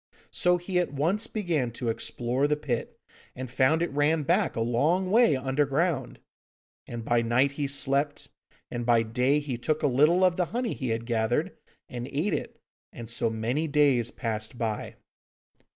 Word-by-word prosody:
So 180 0 +3
he 180 +1 -1
at 175 - -1
once 165 +10 0
began 170 - -1
to 120 0 -3
explore 120 +4 -1
the 150 - +2
pit 140 -6 -4 0.4
and 130 0 -5
found 130 +6 +3
it 170 - -2
ran 145 +2 +2
back - - +1
a - - -2
long 155 +11 +1
way 225 - +5
underground. 140 +2 0 0.7
And 115 -1 -6
by 120 0 +2
night 125 +4 +2
he 140 0 -2
slept, 140 +1 -1 0.4
and 120 0 -3
by 115 -1 +3
day 125 +6 +1
he 135 -5 -4
took 155 +5 -1
a - - +4
little 150 +8 +4
of 180 -2 +3
the 180 - +2
honey 240 +4 -2
he 130 -4 -4
had 115 +1 -2
gathered 115 0 0 0.3
and 120 0 -6
ate 150 +9 -1
it; - - -4 0.3
and 115 - -9
so 115 -1 +1
many 120 +8 -1
days 140 -6 +3
passed 110 0 -4
by. 110 -3 -3
140 Hz, 170 wpm, -27 LUFS, 120-155 Hz, 0.7 s, way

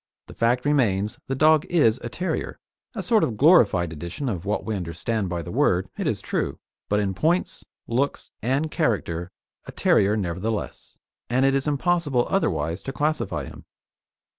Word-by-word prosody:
The - - -12
fact 120 +3 +1
remains 110 -9 +1
the 135 - -1
dog 155 +2 +5
is 130 -9 +3
a 120 - -6
terrier 180 +10 -3 0.4
a - - -3
sort 225 -3 +3
of 110 - -1
glorified 105 - +5
edition 85 - -5
of 95 -4 -4
what 105 +2 -1
we 110 - -2
understand 95 +3 -2
by 85 -1 -3
the - - -7
word, 90 +2 +2
it - - -2
is - - -1
true, - - -2 0.3
but 105 - +2
in 100 -2 0
points, 165 - 0 0.2
looks, 130 +5 -1
and 135 +7 0
character, 95 - -1 0.4
a - - -8
terrier 105 +2 +3
nevertheless, 100 +3 -4 0.3
and 130 +3 +2
it 135 - +3
is 135 +1 0
impossible 150 -3 +1
otherwise 80 - 0
to 135 - -5
classify 135 - -1
him. - - -11
115 Hz, 165 wpm, -24 LUFS, 95-145 Hz, 0.4 s, dog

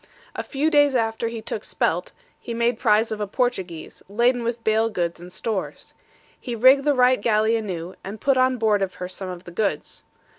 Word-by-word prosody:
A - - -2
few 300 +3 -1
days 290 -3 +4
after 225 -1 0
he 230 -1 -6
took 215 -1 -5
Spelt, - - -1 0.3
he 235 - -6
made 235 0 +1
prize 220 -1 +3
of 215 -1 -3
a 205 - -1
Portuguese, 190 -8 -3
laden 240 +4 +2
with 235 0 -3
bale 220 +1 +2
goods 170 -4 -3
and 180 +1 -10
stores. 200 +1 -4 0.5
He 240 - -5
rigged 260 +4 +5
the 290 -1 +3
Wright 255 -2 +4
galley 220 0 +2
anew, 185 -5 -4
and 205 +3 -7
put 275 +3 +2
on 255 0 +3
board 215 -3 +2
of 190 -1 -2
her 180 - -5
some 185 +1 -7
of 180 -1 -7
the 175 - -11
goods. 200 +3 -3
225 Hz, 200 wpm, -23 LUFS, 195-245 Hz, 0.5 s, rigged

